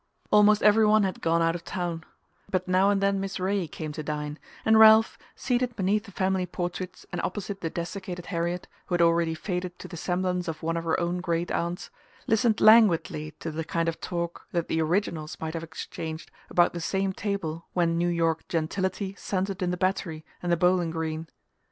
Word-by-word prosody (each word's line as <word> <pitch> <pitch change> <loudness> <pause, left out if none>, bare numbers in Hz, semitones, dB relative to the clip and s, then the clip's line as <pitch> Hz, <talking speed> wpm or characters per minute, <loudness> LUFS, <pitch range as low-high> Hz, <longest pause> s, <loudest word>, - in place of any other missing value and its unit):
Almost 210 0 +5
every 210 +1 +6
one 215 0 +5
had 190 -2 -2
gone 165 0 +2
out 165 0 +2
of 170 0 -6
town; 170 -3 -3 0.5
but 185 -1 -1
now 185 +2 +4
and 200 -1 +2
then 195 0 +2
Miss 195 0 -4
Ray 190 -1 0
came 155 0 -6
to 155 - -5
dine, 150 0 -4 0.3
and 220 0 +6
Ralph, 220 0 +7 0.2
seated 245 -2 -1
beneath 205 +2 +1
the 200 - -12
family 190 -1 0
portraits 180 +1 -5
and - - -2
opposite 200 +1 -4
the 165 - -2
desiccated 175 +1 -5
Harriet, 175 0 -2 0.2
who 180 - 0
had 175 - +2
already 165 -1 +3
faded 180 +1 -4
to - - -9
the 175 - -9
semblance 180 +1 -1
of 160 -1 -5
one 165 +1 0
of 170 0 -3
her 165 - +1
own 175 +1 -1
great 170 -1 -1
aunts, 170 +1 -2 0.3
listened 225 0 +2
languidly 175 -8 +5
to 165 - -3
the 160 +1 -3
kind 165 +1 -1
of 165 - -2
talk 170 -1 -4
that 170 -2 -1
the 160 - +1
originals 160 -2 -1
might 160 0 -4
have 165 - -3
exchanged 160 0 -7 0.2
about 175 - +3
the 170 - -4
same 190 +3 0
table 185 -6 -3
when 170 -2 +2
New 175 0 +2
York 165 -2 0
gentility 190 +4 -2
centred 195 0 -2
in 180 - +1
the 180 - -1
Battery 175 -4 -1 0.2
and 175 - -1
the 170 - +3
Bowling 180 0 +3
Green. 160 0 -3
175 Hz, 200 wpm, -27 LUFS, 165-195 Hz, 0.5 s, Ralph